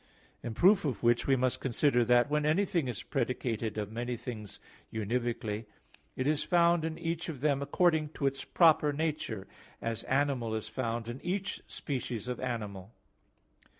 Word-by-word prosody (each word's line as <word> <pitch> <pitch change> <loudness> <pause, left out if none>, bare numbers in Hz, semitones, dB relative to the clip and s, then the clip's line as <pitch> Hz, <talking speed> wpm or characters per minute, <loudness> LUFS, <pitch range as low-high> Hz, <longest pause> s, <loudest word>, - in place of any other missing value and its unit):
In 115 -2 -5
proof 190 +2 +5
of 130 -9 -2
which 120 0 +3
we 135 - +5
must 130 -1 +1
consider 125 -1 +2
that 120 +2 +5
when 150 +1 +1
anything 165 -1 +2
is 120 - -4
predicated 115 -4 -2
of 105 -1 -3
many 120 +2 -3
things 110 -4 -7 0.3
univocally, 110 0 -2 0.5
it 130 - -2
is 150 +1 +2
found 170 -2 +4
in 160 0 -3
each 165 0 -3
of 140 -6 -6
them 140 -2 +2
according 155 +1 +2
to 140 - -3
its 135 0 0
proper 155 -3 +4
nature; 145 -9 -2 0.3
as 115 -1 -3
animal 130 -5 +1
is 110 0 -3
found 115 0 -3
in 120 +3 -6
each 190 +2 -2
species 125 -6 -4
of 125 - -3
animal. 105 -5 -4
130 Hz, 160 wpm, -31 LUFS, 115-155 Hz, 0.5 s, proof